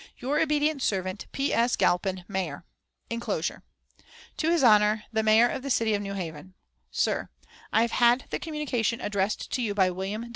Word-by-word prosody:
"Your 275 +4 -1
obedient 300 -1 +1
servant, 190 -2 -2
"P. 275 +1 -1
S. 235 +1 +2
GALPIN, 185 0 0
Mayor." 180 -5 -4 0.5
(Inclosure.) 230 +1 -2 0.7
"TO 320 - 0
HIS 335 -4 +2
HONOR 210 -2 +5
THE 220 - +2
MAYOR 220 +2 +5
OF 265 - -4
THE 275 - -5
CITY 225 -4 +2
OF 205 - 0
NEW 200 -1 -5
HAVEN: 175 0 -7 0.3
"SIR, - - -1 0.4
I 220 - +4
have 235 - -1
had 240 +2 +4
the - - -2
communication 275 -8 -2
addressed 200 0 -2
to 255 - -1
you 210 -4 -1
by 190 -2 +3
Wm. 200 +6 -4
220 Hz, 175 wpm, -27 LUFS, 195-250 Hz, 0.7 s, HONOR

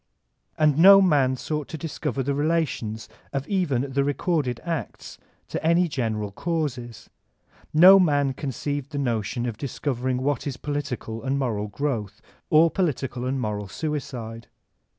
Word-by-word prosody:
And 150 -1 +3
no 195 +3 +9
man 145 -9 +3
sought 150 +3 -4
to 160 - -6
discover 145 -3 -3
the 140 +2 -1
relations 145 -8 -1 0.2
of 135 0 -3
even 175 -11 0
the 140 +1 +1
recorded 145 -3 -1
acts 170 -2 -5 0.3
to - - -4
any 170 +2 +3
general 110 -8 -2
causes; 125 -5 -4 0.6
no 185 +5 +8
man 145 -6 +2
conceived 145 +1 -4
the - - -3
notion 120 -3 -1
of 115 -3 -4
dis 140 - -5
coveriQg 130 -2 -1
what 145 +1 -1
is 135 -3 -4
political 140 -6 -4
and 135 +1 0
moral 110 -6 -1
growth 105 -3 -3 0.3
or 160 +1 +5
political 135 -8 -2
and 135 +1 -1
moral 105 -3 -3
suicide. 120 -3 -5
140 Hz, 145 wpm, -24 LUFS, 120-155 Hz, 0.6 s, no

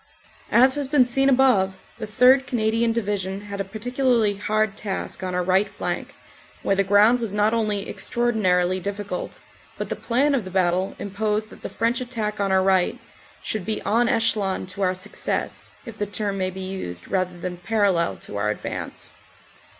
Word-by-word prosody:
As 260 +3 +6
has 290 -1 -1
been 265 -2 +4
seen 270 +3 +2
above, 245 -8 +3 0.2
the - - -4
3rd. 255 +5 +5
Canadian 230 0 +1
Division 200 -3 -2
had 200 -1 -5
a - - 0
particularly 230 +1 +1
hard 215 +1 0
task 195 -2 -5
on 185 -1 -3
our 180 - +1
right 190 +3 +2
flank, - - -4 0.5
where 195 - +2
the 195 - +2
ground 205 +5 +5
was 220 -4 -3
not 210 +2 +3
only 210 -3 -1
extraordinarily 185 -6 +1
difficult, 200 -1 -5 0.4
but - - -4
the - - -2
plan 270 +5 +1
of 260 -5 +1
the 185 - -7
battle 185 0 +1
imposed 210 +2 -2
that - - -13
the - - -5
French 235 +3 0
attack 220 -4 -3
on 200 -1 0
our 190 0 +4
right 190 -2 +2 0.5
should 215 -3 -3
be 215 +3 -2
en 230 +3 +2
echelon 210 -7 +1
to 185 +2 -7
our 185 -1 +2
success 185 - -3 0.2
if 230 -2 -10
the 205 - -1
term 205 0 -2
may 185 -1 -1
be 190 +1 -7
used 185 - -5
rather 185 -2 -1
than 180 0 -5
parallel 185 - +1
to 95 +3 -8
our 105 +1 0
advance. 105 - -5
205 Hz, 180 wpm, -23 LUFS, 190-230 Hz, 0.5 s, As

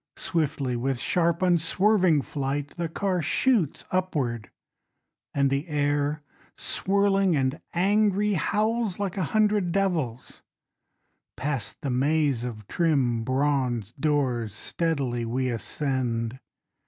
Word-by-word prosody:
Swiftly, 145 -6 -1
with 130 +2 -1
sharp 170 +7 +1
unswerving 180 -1 +3
flight 140 0 -3
The 170 0 -4
car 185 +1 -1
shoots 190 - +1
upward, 145 - -1 0.8
And 140 -1 +1
the 140 +5 -1
air, 145 0 0 0.3
swirling 195 -2 +1
and 135 +2 0
angry, 205 +2 +2
Howls 215 +2 0
like 200 -3 -2
a 190 -4 0
hundred 210 -4 +2
devils. 165 -11 -1 1.0
Past 135 -5 -3
the 140 - -2
maze 140 -1 +1
of 110 -4 -6
trim 135 -9 +1
bronze 130 -4 0
doors, 130 -7 0
Steadily 140 -8 -1
we 125 +3 -1
ascend. 120 -1 -2
150 Hz, 105 wpm, -26 LUFS, 130-185 Hz, 1.0 s, unswerving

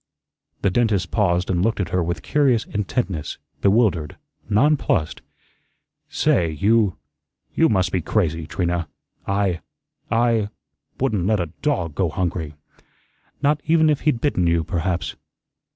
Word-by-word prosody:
The 100 - +3
dentist 105 -4 +1
paused 90 -4 +1
and 90 0 +1
looked 110 0 0
at 90 -4 -1
her 90 - +1
with 85 -1 -3
curious 135 -7 +2
intentness, 100 - -3 0.2
bewildered, 100 -7 +2 0.3
nonplussed. 115 - +2 0.9
"Say, 85 -2 +2
you 100 +5 +2 0.6
you 165 - +3
must 95 -5 +1
be 95 - 0
crazy, 80 -4 0
Trina. 85 -2 -1 0.4
I 100 -3 0 0.5
I 115 -3 +2 0.5
wouldn't 110 -9 0
let 110 -1 +2
a 85 -3 -3
DOG 90 - 0
go 90 +2 0
hungry." 80 -2 -3 0.9
"Not 145 +1 +2
even 160 -1 +4
if 145 - 0
he'd 135 -6 +1
bitten 95 - +1
you, 85 -1 +2
perhaps." 85 0 -2
95 Hz, 130 wpm, -22 LUFS, 85-115 Hz, 0.9 s, even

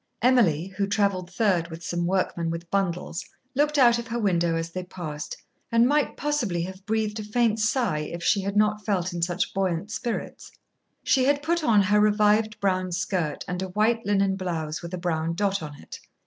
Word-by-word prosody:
Emily, 215 - +4
who 200 - +1
traveled 200 -3 0
third 185 -4 +1
with 165 0 -9
some 175 0 -1
workmen 180 -2 0
with 165 +1 -6
bundles, 180 -3 -1 0.3
looked 295 +2 +1
out 240 -3 +6
of 235 - -6
her 235 0 -3
window 175 -6 +1
as 165 0 -3
they 185 +1 -4
passed, 155 -5 -6 0.3
and 230 0 +5
might 290 +1 +1
possibly 240 -13 -1
have 190 +2 -8
breathed 220 0 -1
a - - -4
faint 225 +1 +1
sigh 220 - +1
if 170 +3 -5
she 200 - +3
had 200 +1 -2
not 210 0 +2
felt 185 -3 -1
in 170 - -4
such 175 +1 -1
buoyant 190 0 -1
spirits. 235 0 -4 0.5
She 260 -1 +3
had 285 +1 +2
put 335 +1 0
on 215 -7 +4
her 205 +2 +3
revived 210 +1 +3
brown 185 -2 0
skirt 175 -4 -2
and 180 0 -3
a 190 - -3
white 220 +4 +1
linen 195 -2 +2
blouse 160 -5 -3
with 170 +1 -5
a - - -5
brown 165 -2 -1
dot 200 0 0
on 150 -2 -8
it. - - -10
195 Hz, 195 wpm, -25 LUFS, 175-220 Hz, 0.5 s, out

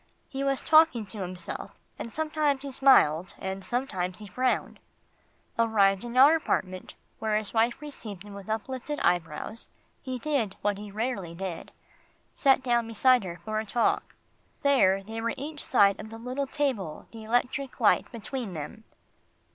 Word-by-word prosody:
He 270 0 -4
was 275 -1 0
talking 310 -8 +5
to 205 +2 -8
himself, 180 0 -6 0.2
and 230 - -5
sometimes 305 -2 0
he 280 - -5
smiled, 185 - +4
and 190 0 -5
sometimes 190 -8 -2
he 215 - -9
frowned. 250 +6 -1 0.8
Arrived 200 -4 +3
in 240 +1 -5
our 285 +5 +8
apartment, 185 - -2 0.2
where 215 -1 +1
his 215 -1 -3
wife 230 +1 +2
received 220 -10 -8
him 205 -1 -11
with 200 +1 -10
uplifted 260 +6 -3
eyebrows, 175 +5 -1 0.3
he 260 -2 -4
did 250 -7 -1
what 205 -1 0
he 210 0 -8
rarely 200 -5 -3
did 185 -2 -5 0.6
sat 270 -1 +3
down 240 -2 +1
beside 245 +2 +4
her 175 -2 -6
for 215 0 -1
a - - -2
talk. 230 +2 0 0.5
There 195 -9 +4
they 225 +2 -6
were 230 0 -1
each 295 +2 -6
side 200 -5 +4
of 215 - -7
the 225 - -8
little 255 +4 -3
table, 250 - -2
the 225 -1 -9
electric 250 +4 -1
light - - +3
between 235 -2 -5
them. 220 +9 -7
225 Hz, 160 wpm, -28 LUFS, 195-265 Hz, 0.8 s, our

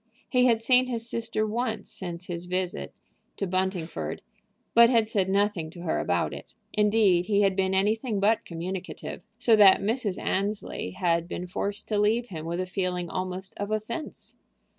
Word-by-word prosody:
He 250 0 +4
had 230 -2 +3
seen 250 +2 +4
his 230 -2 -3
sister 230 -2 -1
once 225 +1 -2
since 175 -1 -5
his 175 -1 -5
visit 180 0 -2 0.5
to 200 - -1
Buntingford, 185 -2 -2 0.5
but 235 0 +8
had 230 -3 +3
said 195 -3 0
nothing 195 -5 +1
to 170 +2 -11
her 175 - -1
about - - 0
it. - - -10 0.2
Indeed, 210 -4 +3
he 205 -1 +3
had 195 -2 +3
been 190 0 +1
anything 215 +2 +1
but 215 +3 +3
communicative, 180 +2 -6 0.2
so 240 -2 +5
that 200 -2 +8
Mrs. 210 -2 -1
Annesley 200 - -2
had 170 -1 +1
been 180 - -5
forced 200 +3 -2
to 210 -2 +1
leave 225 +4 +2
him 160 -3 -6
with 170 +1 -2
a 185 - -1
feeling 180 -2 -2
almost 185 +1 -4
of 205 0 -3
offense. 215 +8 -5
200 Hz, 170 wpm, -27 LUFS, 180-220 Hz, 0.5 s, but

